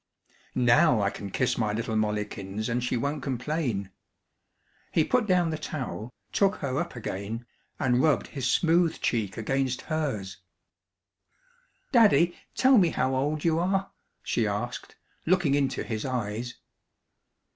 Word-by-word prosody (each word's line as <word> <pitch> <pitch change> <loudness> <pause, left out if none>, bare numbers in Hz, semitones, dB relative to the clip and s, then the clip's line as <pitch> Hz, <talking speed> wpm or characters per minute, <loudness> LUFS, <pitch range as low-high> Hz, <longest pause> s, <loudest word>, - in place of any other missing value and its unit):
"Now 120 -1 +5
I 100 -1 +1
can 100 -2 -7
kiss 125 +6 0
my 105 -2 +1
little 110 +1 -2
Mollikins 105 0 -2
and 120 +1 0
she 125 - 0
won't 140 +4 -2
complain." 125 - -2 1.0
He 160 - +3
put 250 +5 +1
down 180 -3 +3
the 155 - -3
towel, 130 -7 -5 0.2
took 200 0 +3
her 140 -1 -2
up 170 -5 -4
again, 110 +1 -5 0.3
and 125 -1 +2
rubbed 155 -2 +2
his 130 -3 -2
smooth 165 0 +3
cheek 110 -5 -1
against 130 +2 -1
hers. 105 -12 -2 1.5
"Daddy, 175 - +5 0.2
tell 260 -2 +6
me 175 -3 +4
how 130 -3 0
old 145 +3 -1
you 165 -1 +3
are," 190 +2 0 0.3
she - - 0
asked, - - -4 0.3
looking 180 -7 +3
into 140 -2 +1
his 110 -2 -4
eyes. 120 -2 -3
130 Hz, 135 wpm, -27 LUFS, 110-160 Hz, 1.5 s, tell